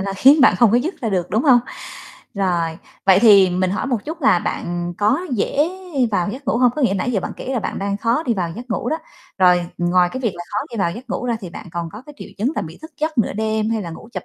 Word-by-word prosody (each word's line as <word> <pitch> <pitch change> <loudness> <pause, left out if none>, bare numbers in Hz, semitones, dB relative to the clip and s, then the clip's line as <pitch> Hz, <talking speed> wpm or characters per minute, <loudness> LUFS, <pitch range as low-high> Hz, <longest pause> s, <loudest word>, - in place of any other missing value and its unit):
là 195 0 -3
khiến 275 +10 +5
bạn - - +6
không 235 -4 +5
có 235 - +4
dứt 315 +10 -2
ra 230 - -1
được, 185 -4 -1
đúng 220 +5 +1
hông? 255 -5 +6 0.7
Rồi, 170 -4 -1 0.3
vậy 190 -1 +7
thì 200 -5 +7
mình 185 +1 0
hỏi 200 - -2
một 250 -4 0
chút 320 +1 -7
là 180 -8 +5
bạn 175 0 -4
có 215 +10 +2
dễ 275 +7 +1 0.4
vào 180 -2 0
giấc 265 +5 -8
ngủ - - +1
hông? 250 -1 +4
Có 300 - -1
nghĩa 230 -6 +2
nãy 220 +6 -1
giờ 195 - +1
bạn - - -5
kể 265 - -5
là 250 - 0
bạn 215 - -4
đang 200 0 -2
khó 235 +7 0
đi 240 -7 0
vào 175 -3 -2
giấc 245 0 -9
ngủ - - -2
đó. 315 - 0 0.4
Rồi 180 -1 +4
ngoài 175 +1 +3
cái 260 - -4
việc 230 -6 -1
là 175 - -7
khó 205 - -1
đi 235 - -7
vào 170 -3 +1
giấc 245 +4 -10
ngủ - - -3
ra 235 -2 0
thì 185 -5 -8
bạn 200 - -9
còn 170 -1 -3
có 215 +4 -9
cái 295 - -12
triệu - - -9
chứng 250 +9 0
là - - 0
bị 165 0 -9
thức 315 - -10
giấc 310 -2 -1
nửa 230 - +2
đêm 220 +1 -1
hay 220 -2 -1
là 170 - -6
ngủ 165 +7 -11
chập - - -5
215 Hz, 285 wpm, -20 LUFS, 180-250 Hz, 0.7 s, vậy